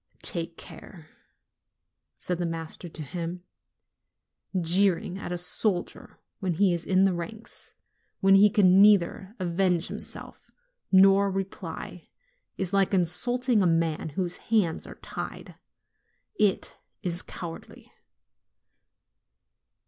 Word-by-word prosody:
'Take 165 -1 -2
care," 165 -5 -10 1.1
said 180 -1 -3
the 175 - 0
master 165 +1 -6
to 155 -1 -8
him; 170 +4 -5 1.2
"jeering 180 +1 +1
at 175 - -6
a 175 - -1
soldier 180 +1 -1 0.2
when 190 -4 -1
he 190 +2 +3
is 170 0 -4
in 190 0 +4
the 195 -1 +3
ranks, 215 +6 -7 0.4
when 195 0 +5
42 195 - +7
NOVEMBER - - +5
he 210 - +7
can 195 -3 +5
neither 200 0 +4
avenge 180 -1 +1
himself - - -8 0.4
nor 195 +1 +6
reply, 195 0 -6 0.5
is 190 -1 -3
like 195 0 +3
insult 215 +9 0
ing 235 -5 +4
a 185 - +3
man 165 -1 0
whose 180 -2 -1
hands 205 -8 +1
are - - -10
tied: - - -8 0.7
it 205 -3 0 0.2
is 175 -1 -2
cowardly." 165 -2 -9
185 Hz, 120 wpm, -27 LUFS, 170-195 Hz, 1.2 s, 42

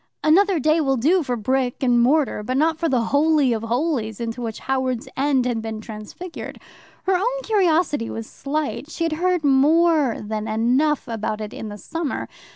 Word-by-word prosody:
"Another 375 +4 +4
day" 310 +3 +3
will 270 -3 +1
do 330 +10 +3
for 250 -5 -2
brick 255 +3 -1
and 245 -2 +4
mortar, 275 -2 +2
but 255 +5 -2
not 320 +2 +2
for 330 - 0
the 255 -4 +2
Holy 290 -3 +3
of 220 - -2
Holies 235 -2 -1
into 235 +1 -4
which 225 -2 -4
Howards 260 -2 -1
End 270 -2 +1
had 240 -3 -1
been 220 -1 -5
transfigured. 220 +11 -8 0.4
Her 380 - +2
own - - 0
curiosity 340 - +1
was 225 - -5
slight. 290 +4 -4
She 335 - -4
had 330 -1 0
heard 355 +1 0
more 295 0 +3
than 215 +1 -4
enough 255 +7 +1
about 220 -2 -3
it 215 -1 -6
in 220 - -6
the 205 - -7
summer. 325 +6 -4
270 Hz, 180 wpm, -22 LUFS, 230-320 Hz, 0.4 s, Another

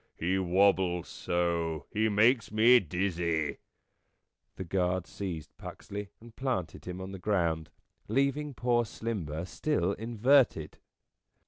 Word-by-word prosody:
He 95 +3 0
wobbles 95 -1 +2
so 85 -3 -1
he 110 +1 +1
makes 110 +3 +3
me 115 +3 +6
dizzy 85 -4 -1 0.5
." - - -51
The - - -4
guards 90 0 -1
seized 85 -6 -6
Puxley 100 0 -7
and 115 0 -15
planted 125 -11 -3
him 90 0 -6
on 95 +1 -6
the 95 - -7
ground, 85 -6 0 0.4
leaving 140 +4 0
poor 120 -1 +2
Slimber 95 -9 -4
still 95 - 0
inverted. 115 - +2
95 Hz, 120 wpm, -30 LUFS, 85-115 Hz, 0.5 s, me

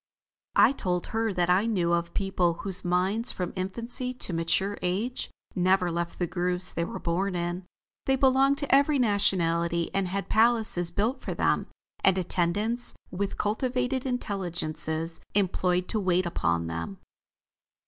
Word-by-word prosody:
I - - +6
told 180 -9 -1
her 225 0 +1
that 180 -2 +1
I 195 +5 +3
knew 175 -6 +1
of 170 0 +1
a - - -25
people 190 -4 0
whose 190 -2 +4
minds 185 +6 +1
from 180 -2 -4
infancy 235 +7 -3
to 195 - +1
mature 190 +5 +1
age, 205 +8 -2 0.2
never 185 -1 +2
left 170 0 -3
the 175 - 0
grooves 180 +1 -2
they 170 - -1
were - - -5
born 180 +3 -1
in. 175 +1 -3 0.4
They 270 - +4
belonged 270 +1 +3
to 285 -2 -2
every 285 +1 +3
nationality, 170 -7 +1
and 195 -1 0
had 195 +2 -3
palaces 220 -6 +3
built 220 +9 -1
for - - -4
them, - - +1 0.4
and 190 -1 +4
attendants 190 +7 0 0.2
with 195 +2 -3
cultivated 250 +4 -1
intelligences 170 -8 -2 0.2
employed 180 -2 +1
to 220 - 0
wait 185 -2 +1
upon 85 - 0
them. 85 +3 -5
185 Hz, 150 wpm, -27 LUFS, 175-225 Hz, 0.4 s, I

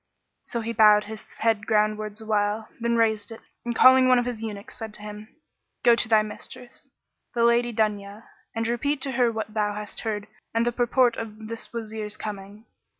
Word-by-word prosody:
So 235 - -4
he 230 +1 -3
bowed 210 -1 +6
his 215 +1 -9
head 220 -2 +1
groundwards 215 0 0
awhile, 215 0 0
then 235 0 0
raised 220 -1 +1
it 225 - -8 0.2
and 235 -1 -3
calling 260 +1 +7
one 255 0 +6
of 245 - +1
his 240 -3 -4
eunuchs, 210 -3 -7
said 220 -1 -6
to 210 - -11
him, 210 0 -8 0.6
"Go 235 - +7
to 230 - -1
thy 215 -1 +5
mistress, 240 +3 -10 0.5
the 235 - +2
Lady 235 +1 +3
Dunya, 210 -1 -2 0.3
and 225 0 -1
repeat 270 +5 0
to 270 - 0
her 245 -2 +2
what 220 -1 -5
thou 210 -1 0
hast 210 -1 -6
heard 210 -2 -3 0.3
and 230 +1 +2
the 240 - +2
purport 245 0 +2
of 220 -1 -7
this 230 0 -7
Wazir's 220 -2 -5
coming." 205 +1 -7
220 Hz, 190 wpm, -25 LUFS, 210-235 Hz, 0.6 s, calling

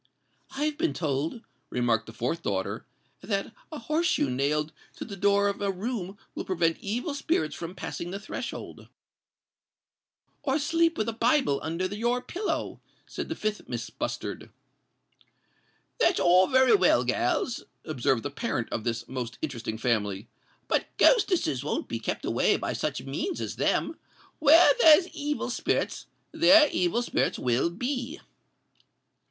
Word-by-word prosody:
"I've 300 +2 -1
been 335 0 0
told," 155 - -2 0.3
remarked 115 -2 0
the - - -8
fourth 125 +9 -2
daughter, 95 - -3 0.3
"that 200 +2 -2 0.2
a 310 - -5
horse 310 +8 0
shoe 145 - +1
nailed 150 +4 0 0.2
to - - -6
the 200 - -7
door 200 +1 +3
of 200 - -2
a 200 - 0
room 195 0 -4 0.2
will - - -4
prevent 165 -3 0
evil 240 - -3
spirits 275 - 0
from 175 +2 -7
passing 170 - -5
the 195 +2 -5
threshold." 205 - -7 1.5
"Or 270 0 +1
sleep 330 +2 +1
with 215 - -1
a 230 - -1
Bible 230 - +2
under 165 +3 -2
your 230 +6 0
pillow," 380 +11 -3 0.2
said - - -6
the 325 - -2
fifth 215 -5 -3
Miss - - -4
Bustard. - - -5 1.5
"That's 375 -7 +3
all 180 +1 +5
very 260 +5 +5
well, 415 - +4
gals," 245 - 0 0.2
observed 130 -5 0
the 145 - -3
parent 140 - -2
of 110 - -2
this 115 0 -3
most 125 -2 -5
interesting 115 -7 -4
family; 105 -4 -1 0.4
"but - - +1
ghostesses 400 -7 +3
won't - - -2
be - - -4
kept - - -3
away - - +2
by - - -3
such - - -3
means 380 - -3
as - - -4
them. - - 0 0.4
Where 315 +3 +7
there's 320 +3 +7
evil 295 0 -3
spirits, - - -1 0.2
there 320 -1 +6
evil 180 +7 +1
spirits - - 0
will 125 +6 +1
be." 250 - -4
200 Hz, 145 wpm, -27 LUFS, -, 1.5 s, Where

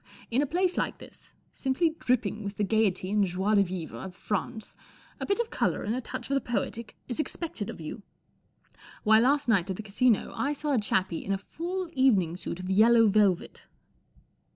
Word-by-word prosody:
In 250 +4 +3
a 290 - 0
place 360 +4 0
like - - -1
this, - - -14 0.2
simply 275 +5 0
dripping 220 -4 0
with 200 0 -5
the 210 - +1
gaiety 200 -3 +1
and 210 -1 +3
joie 190 +3 0
de 205 - +6
vivre 180 -4 -4
of 190 -1 -8
France, 220 +3 -4 0.4
a - - -4
bit 400 +3 +1
of 470 -1 -1
colour - - 0
and 210 - -1
a 255 - -2
touch - - -6
of - - +2
the 275 - +2
poetic 230 -1 -3
is 245 - -3
expected 305 - -3
of - - -7
you. 160 +7 -7 1.0
Why, 220 0 +6
last 280 +4 +3
night 200 -5 +2
at 190 - -1
the 215 - -7
Casino 215 +2 +2
1 290 +2 -1
saw 295 0 -2
a 250 - +3
chappie 190 -5 0
in 195 - -3
a - - 0
full 350 - -4
evening 205 - +3
suit 180 -1 -5
of 185 - -6
yellow 225 +3 +6
velvet." 200 -4 +1
220 Hz, 200 wpm, -28 LUFS, 195-265 Hz, 1.0 s, de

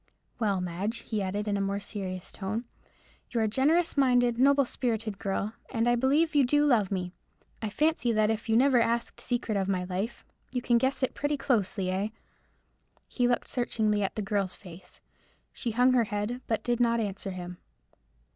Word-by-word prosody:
Well, 200 -5 +1
Madge," 185 +6 -3
he 215 -3 -2
added, 200 +2 -2
in 205 -1 +1
a - - -1
more 195 0 -1
serious 190 -3 -6
tone, 215 +5 -4 0.6
"you're 230 -3 0
a - - +2
generous 305 +10 +2
minded, 245 -3 +3
noble 280 +1 +5
spirited 225 -5 -2
girl, 200 +2 -2 0.2
and 230 -1 0
I 240 - +4
believe 285 +6 +2
you 290 -2 +5
do 290 +4 +3
love 225 -9 +3
me. 180 -2 -3 0.5
I 220 - -2
fancy 300 -1 +1
that 215 -1 +3
if 225 +1 -4
you 225 - +4
never 260 -1 +5
asked 235 +1 -1
the - - -15
secret 240 -4 -1
of 195 -1 0
my 185 -2 0
life, 190 +6 -4 0.3
you 250 - -1
can 240 -1 +3
guess 265 +2 0
it 260 - +1
pretty 290 0 -1
closely, 205 -8 0
eh?" 195 +3 0 1.0
He 245 -1 +1
looked 245 - 0
searchingly 215 -4 0
at 195 - -1
the 215 - -2
girl's 195 -2 -1
face. 180 -1 -14 0.5
She 240 - -3
hung 250 +3 +4
her 240 -2 +4
head, 210 +4 -3
but 225 - -1
did 240 -1 0
not 235 -1 +3
answer 200 -2 -3
him. 180 -1 -7
225 Hz, 190 wpm, -28 LUFS, 200-245 Hz, 1.0 s, noble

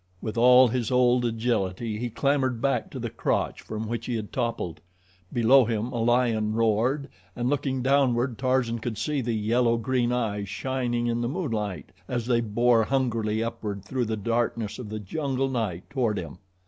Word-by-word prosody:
With 110 +2 -5
all 125 +2 +7
his 120 -1 -1
old 125 -1 +3
agility 110 -2 -1
he 120 +1 -2
clambered 130 -1 0
back 125 -2 0
to - - -8
the - - -4
crotch - - -1
from 110 0 -5
which 115 0 -4
he 125 - -1
had 110 -2 -4
toppled. 115 - -2 0.5
Below 125 +3 +5
him 115 +1 -2
a 120 -2 -2
lion 115 -3 +2
roared, 115 +6 +1 0.3
and, 120 0 -1
looking 135 -2 -1
downward, 130 -3 +2
Tarzan 130 -3 +1
could 115 -1 -4
see 150 -3 -1
the 120 -2 -1
yellow 115 +2 +2
green 120 0 0
eyes 105 -5 -1
shining 120 0 -2
in 120 0 0
the 120 - -1
moonlight 115 - -3 0.2
as 120 -2 -2
they 120 -1 +2
bored 115 +1 +2
hungrily 115 -5 0
upward 105 -4 -5
through 125 +3 -1
the 110 0 -2
darkness 115 0 -1
of 115 -5 -7
the 110 - -4
jungle 135 +5 -2
night 110 -9 -3
toward 120 -6 0
him. 85 -1 -6
120 Hz, 175 wpm, -26 LUFS, 110-125 Hz, 0.5 s, all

